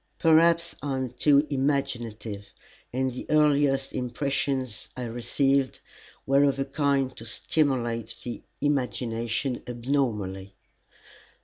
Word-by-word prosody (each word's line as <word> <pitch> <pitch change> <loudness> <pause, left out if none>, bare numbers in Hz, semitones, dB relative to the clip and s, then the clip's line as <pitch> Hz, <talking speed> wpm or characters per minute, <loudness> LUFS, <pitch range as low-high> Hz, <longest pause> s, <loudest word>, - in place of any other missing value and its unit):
Perhaps 170 +1 +4
I 140 -1 -2
am 130 -1 -2
too 140 +3 +4
imaginative, 120 -7 -2 0.4
and 130 +1 0
the 125 - -7
earliest 145 -3 +3
impressions 130 -1 -2
I 125 - -3
received 130 +3 0 0.5
were 140 +1 +4
of 140 -1 +3
a 135 - 0
kind 135 -2 0
to 115 - -9
stimulate 120 -4 0
the 120 - -5 0.2
imagination 125 -3 -1
abnormally. 115 -7 -2
130 Hz, 105 wpm, -27 LUFS, 120-140 Hz, 0.5 s, Perhaps